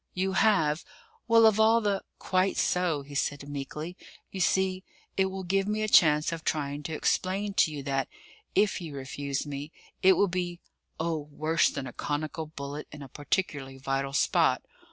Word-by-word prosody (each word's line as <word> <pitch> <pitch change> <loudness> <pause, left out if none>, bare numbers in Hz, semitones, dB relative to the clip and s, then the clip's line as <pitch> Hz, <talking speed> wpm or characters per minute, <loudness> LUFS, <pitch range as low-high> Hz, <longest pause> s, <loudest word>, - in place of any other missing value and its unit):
"You 190 +1 0
have? 175 -7 +3 0.4
Well, 230 -1 +6
of 220 -1 +5
all 225 +1 +6
the 205 -3 0
!" - - -50
"Quite 185 +1 +2
so," 175 -5 +1
he 145 +1 -12
said 140 0 -2
meekly. 145 +4 -5 0.4
"You 190 - -6
see, 190 0 +1 0.3
it 190 - +3
will 190 0 -5
give 195 +2 +1
me 215 +1 0
a - - 0
chance 150 -6 +5
of 165 -1 -5
trying 145 -1 -1
to - - -4
explain 195 +5 0
to 155 - +4
you 145 -2 -6
that, 135 -1 -1 0.5
if 200 -1 +2
you 155 -4 -7
refuse 140 +1 -3
me, 145 +1 -6 0.3
it 190 0 +7
will 200 - +3
be 175 -1 -3 0.4
oh, 160 -2 -2
worse 155 +3 +2
than 135 - -5
a 125 - -7
conical 155 +2 -3
bullet 145 -1 -7
in 150 -1 -9
a 135 - -10
particularly 145 -2 -2
vital 135 +1 -2
spot. - - +3
160 Hz, 180 wpm, -28 LUFS, 145-190 Hz, 0.5 s, it